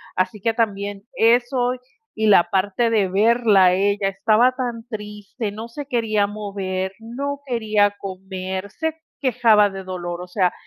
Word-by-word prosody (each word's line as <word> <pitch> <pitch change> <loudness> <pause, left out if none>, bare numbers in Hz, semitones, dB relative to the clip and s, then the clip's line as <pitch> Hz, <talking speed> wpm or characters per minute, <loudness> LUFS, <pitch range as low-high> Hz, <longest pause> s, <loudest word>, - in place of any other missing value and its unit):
Así 190 +3 -1
que 230 +2 +1
también, 205 -3 -2
eso 245 +2 +3 0.4
y 220 0 0
la 195 -4 +7
parte 205 +5 +1
de 210 -4 +2
verla 215 0 +4
a 180 - +5
ella, 200 +1 +1
estaba 215 +6 +3
tan 240 -3 -4
triste, 210 0 -6
no 220 +3 -8
se 285 +4 -7
quería 220 -5 +1
mover, 195 -2 -4
no 275 +5 -5
quería 215 -4 +1
comer, 190 0 -5
se 320 +5 -3 0.2
quejaba 225 -6 +4
de 195 0 -7
dolor. 175 -2 -5
O 180 - -8
sea, 180 -1 +1
210 Hz, 150 wpm, -21 LUFS, 195-230 Hz, 0.4 s, la